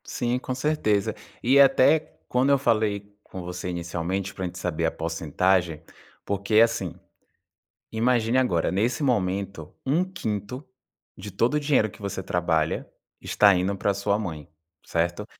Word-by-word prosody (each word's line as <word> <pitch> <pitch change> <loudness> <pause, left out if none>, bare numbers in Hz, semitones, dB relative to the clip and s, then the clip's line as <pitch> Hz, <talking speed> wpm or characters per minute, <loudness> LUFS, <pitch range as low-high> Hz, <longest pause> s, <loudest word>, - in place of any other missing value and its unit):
Sim, 125 0 -1
com 130 0 -4
certeza. 130 -8 0 0.3
E 135 +4 +5
até 140 +2 +6 0.3
quando 125 +2 +2
eu 140 - +5
falei 105 -5 0
com 95 - -8
você 90 +1 -5
inicialmente 85 +2 -3
pra 95 - -4
gente 90 0 -6
saber 85 -2 -1
a 80 - +1
porcentagem, 85 +1 0 0.4
porque 100 +2 -2
assim, 115 -7 +1 1.0
imagine 115 +1 +2
agora, 90 -11 +1
nesse 115 +9 0
momento, 100 - -1
1/5 130 - -2 0.5
de 105 +2 -8
todo 115 +8 +1
o 150 - +2
dinheiro 140 -7 +2
que 105 - -17
você 100 -1 -4
trabalha 85 -3 0 0.3
está 100 -2 +4
indo 95 +2 0
pra 100 +1 0
sua 100 +1 0
mãe, 80 -9 -6 0.4
certo? 85 +5 -1
100 Hz, 140 wpm, -25 LUFS, 90-125 Hz, 1.0 s, até